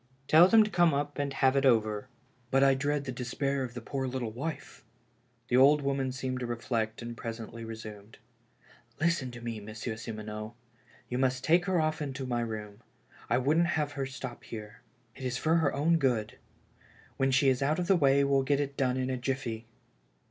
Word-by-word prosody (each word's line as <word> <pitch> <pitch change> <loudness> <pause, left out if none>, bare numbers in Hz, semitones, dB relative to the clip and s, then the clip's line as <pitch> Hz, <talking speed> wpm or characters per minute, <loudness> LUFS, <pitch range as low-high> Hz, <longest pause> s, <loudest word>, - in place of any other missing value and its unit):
" 135 +1 -36
Tell 165 +3 +8
them 220 +2 +7
to 210 - -4
come 175 -5 +4
up 145 +1 -2
and 140 -1 -1
have 135 -1 +2
it 140 - +2
over." 110 -3 +2 0.2
" 125 -2 -37
But 135 +1 +3
I 135 -1 +6
dread 145 +1 -1
the 130 - -3
despair 135 +3 -2
of 125 -1 -6
the 120 - -5
poor 135 -1 -3
little 125 -3 -3
wife." 140 +6 -6 0.6
The 125 - +2
old 145 +3 +6
woman 135 -1 0
seemed 130 0 -3
to 125 - -3
reflect 115 -1 -2
and 120 0 -6
presently 115 0 -7
re 115 0 -6
sumed: 105 -1 -10 0.8
"Listen 165 -5 +1
to 120 0 -10
me. 115 -2 -4
Monsieur 110 +2 -6
Simoneau. 110 0 -6 0.5
You 125 - -2
must 130 -1 +1
take 175 +2 +4
her 185 -3 +1
oft* 155 -3 -1
to 135 -1 -4
my 120 -2 -1
room. 105 -2 -5 0.5
I 120 - +3
wouldn't 155 +7 +3
have 150 -1 0
her 135 -2 -3
stop 130 -2 -7
here. 105 -1 -9 0.3
It 135 - -10
is 125 -1 -1
for 160 +1 +2
her 160 -4 +2
own 165 +4 +2
good. 120 -7 0 0.8
When 135 0 +2
she 135 +1 +3
is 130 0 +1
out 145 +3 +1
of 180 - -1
the 195 +2 +4
way 140 -4 +4
we'll 140 -1 +3
get 140 +1 +1
it 140 -1 -2
done 130 -2 +1
in 130 0 -1
a 130 - -1
jiffy." 125 -3 -3
130 Hz, 205 wpm, -30 LUFS, 120-140 Hz, 0.8 s, Tell